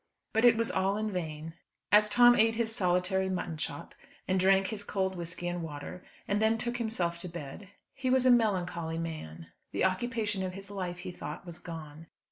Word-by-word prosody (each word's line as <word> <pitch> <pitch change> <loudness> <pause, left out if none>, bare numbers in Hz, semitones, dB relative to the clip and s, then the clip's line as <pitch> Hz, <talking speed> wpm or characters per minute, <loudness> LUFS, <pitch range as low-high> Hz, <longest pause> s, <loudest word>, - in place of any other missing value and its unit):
But 225 +2 +3
it 235 -2 +7
was 230 0 +1
all 195 +2 +1
in 215 0 -1
vain. 160 -3 -4 0.4
As 210 0 +6
Tom 240 +3 +7
ate 225 0 +4
his 225 -1 -1
solitary 185 -1 +1
mutton 175 -3 -2
chop, 150 -2 -5 0.3
and 185 0 +2
drank 190 +1 +4
his 210 -2 -4
cold 190 -2 -1
whisky 175 0 -5
and 175 0 -2
water, 155 +3 -7 0.2
and 205 +1 +1
then 220 +1 +3
took 240 +2 -2
himself 185 -8 -1
to 180 - -4
bed, 170 +3 -8 0.2
he 265 -1 -2
was 260 0 +3
a 255 - +7
melancholy 180 -8 +1
man. 85 - -6 0.2
The - - +1
occupation 205 +1 0
of 185 -1 -3
his 195 +1 -9
life, 180 -3 -4
he 180 +1 -6
thought, 155 -1 -7
was 170 -2 -8
gone. 160 -2 -9
190 Hz, 195 wpm, -30 LUFS, 170-215 Hz, 0.4 s, it